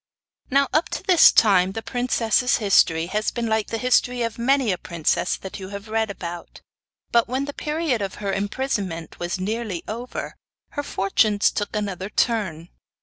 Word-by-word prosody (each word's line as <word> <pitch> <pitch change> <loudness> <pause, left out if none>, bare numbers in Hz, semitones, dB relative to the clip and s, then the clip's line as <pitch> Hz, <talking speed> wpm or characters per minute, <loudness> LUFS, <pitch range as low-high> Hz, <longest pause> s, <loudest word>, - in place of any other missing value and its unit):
Now 275 +1 +3
up 315 +3 +2
to - - -12
this 360 -3 +7
time 190 -3 +4
the 225 - -5
princess's 245 0 +1
history 170 -6 +3
has 210 +1 +1
been 235 -1 -3
like 220 -1 0
the 225 - -3
history 250 0 +2
of 230 0 -4
many 260 -1 +2
a 180 - -2
princess 170 +1 -1
that 190 +1 -8
you 190 -1 -7
have 200 +2 -8
read 220 0 0
about; 175 -3 -7 0.5
but, 235 -1 +3
when 260 +3 -1
the 285 - -6
period 300 -7 -1
of 195 -1 -3
her 200 -1 -3
imprisonment 195 - -3
was 175 +2 -3
nearly 210 -2 -3
over, 235 +3 -5 0.4
her 290 - -3
fortunes 205 -4 +2
took 205 +1 -3
another 195 -2 -3
turn. 190 -9 -1
215 Hz, 170 wpm, -23 LUFS, 190-245 Hz, 0.5 s, this